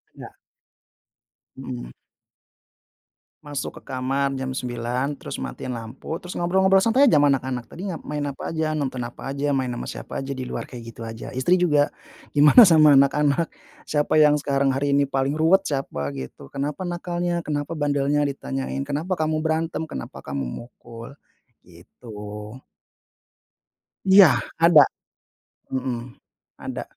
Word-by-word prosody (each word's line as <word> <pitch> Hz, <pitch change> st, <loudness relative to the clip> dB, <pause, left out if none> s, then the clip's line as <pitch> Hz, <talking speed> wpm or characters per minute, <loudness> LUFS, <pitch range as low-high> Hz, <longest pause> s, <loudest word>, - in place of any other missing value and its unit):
Ya. -, -, -11 dB, 1.2 s
Mhm. -, -, -7 dB, 1.5 s
Masuk 145 Hz, -1 st, -5 dB
ke -, -, -10 dB
kamar 135 Hz, +2 st, 0 dB
jam 130 Hz, -1 st, -3 dB
9.00, 125 Hz, +2 st, -2 dB
terus 140 Hz, -, -7 dB
matiin 65 Hz, -, -6 dB
lampu, 120 Hz, +6 st, -6 dB
terus 180 Hz, 0 st, -9 dB
ngobrol-ngobrol 190 Hz, +2 st, +3 dB
santai 240 Hz, +7 st, +4 dB
aja 155 Hz, -, +5 dB
ma 145 Hz, -, +5 dB
anak-anak, 130 Hz, -3 st, -1 dB
"Tadi 180 Hz, -, -8 dB
ngap 180 Hz, -6 st, -4 dB
main 150 Hz, -1 st, -4 dB
apa -, -, -6 dB
aja? 160 Hz, -1 st, -1 dB
Nonton 140 Hz, -4 st, -2 dB
apa 120 Hz, +2 st, -8 dB
aja? 140 Hz, +1 st, -1 dB
Main 130 Hz, -3 st, -1 dB
ama -, -, -5 dB
siapa -, -, -7 dB
aja 135 Hz, +1 st, -4 dB
di 130 Hz, -, -6 dB
luar?" 125 Hz, -, -5 dB
Kayak 120 Hz, -3 st, -10 dB
gitu 115 Hz, -, -12 dB
aja. 115 Hz, 0 st, -7 dB
Istri 130 Hz, +7 st, +1 dB
juga, 150 Hz, -4 st, +3 dB, 0.4 s
"Gimana 150 Hz, -, +8 dB
sama 155 Hz, -5 st, +7 dB
anak-anak? 145 Hz, +3 st, +3 dB, 0.4 s
Siapa 150 Hz, +1 st, +1 dB
yang 150 Hz, -1 st, +5 dB
sekarang 140 Hz, -1 st, +1 dB
hari 140 Hz, +2 st, -1 dB
ini 140 Hz, 0 st, +3 dB
paling 135 Hz, +2 st, -1 dB
ruwet? 185 Hz, +5 st, +3 dB
Siapa," 135 Hz, -, -3 dB
gitu, 65 Hz, +1 st, -9 dB
"kenapa 145 Hz, +4 st, -4 dB
nakalnya? 175 Hz, -1 st, -2 dB
Kenapa 150 Hz, +2 st, -3 dB
bandelnya?" 145 Hz, 0 st, +1 dB
ditanyain. 135 Hz, -1 st, -3 dB
"Kenapa 145 Hz, +6 st, -2 dB
kamu 155 Hz, -2 st, 0 dB
berantem? 160 Hz, 0 st, -1 dB
Kenapa 65 Hz, -, -8 dB
kamu 70 Hz, 0 st, -3 dB
mukul?" 115 Hz, -, -9 dB, 0.5 s
gitu. 105 Hz, +4 st, -10 dB, 1.5 s
Iya! 190 Hz, 0 st, +8 dB, 0.3 s
Ada. 165 Hz, -3 st, +8 dB, 0.9 s
Mhm. 125 Hz, -2 st, -4 dB, 0.4 s
Ada. -, -, -5 dB
140 Hz, 140 wpm, -23 LUFS, 125-155 Hz, 1.5 s, Gimana